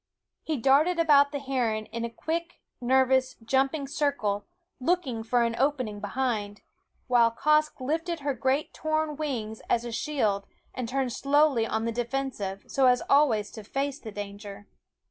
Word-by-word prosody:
He 315 -2 -2
darted 280 +8 +3
about 285 -4 +5
the 290 - -2
heron 245 -6 -1
in 230 +1 -5
a 235 - -2
quick, 335 +8 -4 0.2
nervous, 260 +1 +3
jumping 270 +5 0
circle, 270 -9 -1 0.3
looking 265 -5 0
for 235 +2 +1
an 230 0 0
opening 255 -7 0
behind; 210 -2 -2 0.4
while 240 -2 +4
Quoskh 305 +6 +2
lifted 325 +5 -2
her 280 0 0
great 265 +4 0
torn 310 -1 -1
wings 240 -8 -4
as 235 0 +1
a 240 - -5
shield 220 -7 -1 0.3
and 245 -3 -4
turned 260 -2 -1
slowly 280 -5 +3
on 220 +1 -1
the 230 - 0
defensive, 235 -5 -3
so 270 -1 +3
as 250 0 +3
always 235 -8 +3
to 220 - -9
face 275 +5 -3
the 220 - -8
danger. 205 0 -8
260 Hz, 155 wpm, -27 LUFS, 225-285 Hz, 0.4 s, about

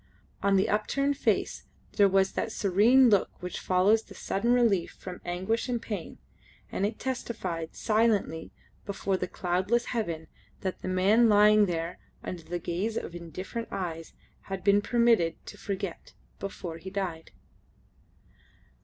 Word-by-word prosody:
On 200 0 +3
the 190 - +3
upturned 275 +7 +1
face - - 0 0.3
there 200 -2 +5
was 195 0 +3
that 220 - -2
serene 220 +8 +5
look 200 - +3
which 180 0 -5
follows 190 +4 +3
the - - -15
sudden 230 +5 -1
relief 225 -8 +3
from 180 -1 -8
anguish 190 +8 -1
and 240 -1 0
pain, 205 -7 -6 0.5
and 200 - 0
it 220 - -6
testified 190 -10 -4
silently 215 -7 +1 0.3
before 195 -1 -2
the 185 -1 -2
cloudless 185 +8 0
heaven 170 -9 -2 0.4
that 185 -1 -3
the - - -5
man 200 +6 +4
lying 210 0 +6
there 170 0 -3 0.2
under 180 -2 -5
the 175 +2 -4
gaze 180 +6 -2
of - - -4
indifferent 185 +7 -6
eyes 165 -3 -5 0.3
had 195 -1 -4
been 200 +1 +5
permitted 225 -7 +3
to - - -9
forget 195 -3 -5 0.3
before 175 -4 -6
he 190 - -7
died. 185 -5 -4
195 Hz, 145 wpm, -28 LUFS, 180-220 Hz, 0.5 s, lying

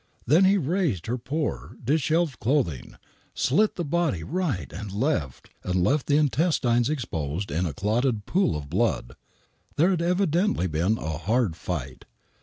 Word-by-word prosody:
Then 160 +9 +5
he 190 - +5
had 190 -8 0
raised 155 - 0
her 120 +2 -2
poor, 145 +5 -3
dishevelled 155 +1 +1
clothing, 115 - -1 0.4
slit 205 +11 +2
the 175 - -3
body 150 - 0
right 155 - -2
and 100 +4 -6
left, 100 - -2
and 90 0 0
left 135 +8 +1
the 145 - +4
intestines 135 -4 +2
exposed 90 - -3
in 85 +5 0
a 75 - -4
clotted 110 - 0
pool 190 - +1
of 70 -1 -7
blood. - - -1 0.6
There 175 +6 +4
had 175 -3 0
evidently 180 - +1
been 90 +6 +1
a 80 -3 -4
hard 110 -2 +1
fight. 70 -7 -5
125 Hz, 155 wpm, -25 LUFS, -, 0.6 s, Then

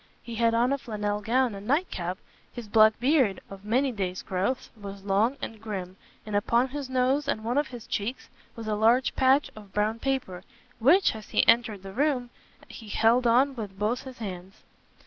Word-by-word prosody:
He 235 - -8
had 230 0 +2
on 245 +3 +2
a 280 - -2
flannel 210 -3 -3
gown 245 +2 +1
and 200 +1 -9
night 305 +8 +1
cap; 180 +1 -3 0.3
his 240 -3 -8
black 215 0 +5
beard, 255 - +2
of 195 0 -10
many 255 +6 +1
days' 190 -5 -3
growth, 195 +8 -2
was 200 -2 -9
long 205 +7 +1
and 220 -2 -6
grim, 190 -4 -5 0.3
and 210 -1 -4
upon 235 +5 +2
his 280 -1 -5
nose 260 +3 +1
and 220 -5 -1
one 235 +2 -1
of 295 - -1
his 245 -2 -10
cheeks 235 +4 -4 0.3
was 230 - -7
a 215 - 0
large 230 +5 +3
patch 265 +2 +3
of 205 -3 -13
brown 215 +2 0
paper, 245 -10 -2 0.4
which, 325 - +5
as 215 -1 -10
he - - +2
entered 230 -4 +3
the 195 0 -8
room, 260 -2 0 0.4
he 220 -3 -11
held 235 +4 +3
on 260 +4 +4
with 205 -5 -7
both 215 +5 -1
his 260 -2 -10
hands. 190 -2 -8
225 Hz, 195 wpm, -27 LUFS, 205-255 Hz, 0.4 s, black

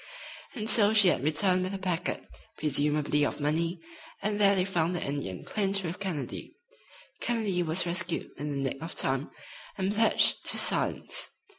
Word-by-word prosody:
And 215 -3 -4
so 215 -2 +5
she 210 -4 +7
had 135 - -1
returned 180 +5 +2
with 185 +2 -4
a - - -3
packet, 180 -2 -3 0.3
presumably 150 0 0
of 145 - -2
money, 165 +4 -1 0.4
and 210 0 -1
there 200 0 +5
they 185 -1 0
found 175 -2 -1
the 175 - -2
Indian 140 -11 -5
clinched 195 -2 0
with 170 +1 -5
Kennedy. 185 -8 -5 0.6
Kennedy 215 -7 -1
was 170 +2 +2
rescued 175 0 -1
in 150 +1 -5
the 140 - -4
nick 135 - -9
of 165 +2 -6
time, 135 +2 0 0.5
and 195 +1 -1
pledged 225 +1 +3
to - - +4
silence. - - +2
180 Hz, 165 wpm, -28 LUFS, 150-195 Hz, 0.6 s, she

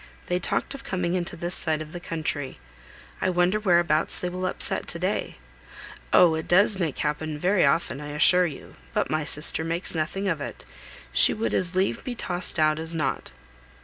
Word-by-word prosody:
They 180 0 -1
talked 180 - -1
of 275 -1 -9
coming 180 -8 -2
into 175 -1 -2
this 175 +1 -3
side 155 -3 0
of 155 0 -8
the 175 - -7
country. 155 -5 -4 0.6
I 190 - +1
wonder 180 +3 +2
whereabouts 170 -6 +2
they 180 - -2
will 185 +1 -3
upset - - +1
to - - +1
day. - - -2 0.7
Oh! 175 -3 +6
it 160 0 -4
does 200 +4 +5
happen 155 -2 -2
very 180 0 +2
often, 145 -1 0
I 145 - -7
assure 180 +4 +4
you; 145 - -10 0.2
but - - 0
my 155 0 0
sister 150 +2 +2
makes 165 +2 0
nothing 170 +5 -2
of 165 -6 -1
it; - - -7 0.5
she - - +5
would 220 +1 -2
as 180 0 -1
lieve 190 +1 0
be 250 - -5
tossed 180 -6 -3
out 155 -1 +2
as 165 +1 -4
not." 155 - -2
175 Hz, 185 wpm, -25 LUFS, 155-185 Hz, 0.7 s, Oh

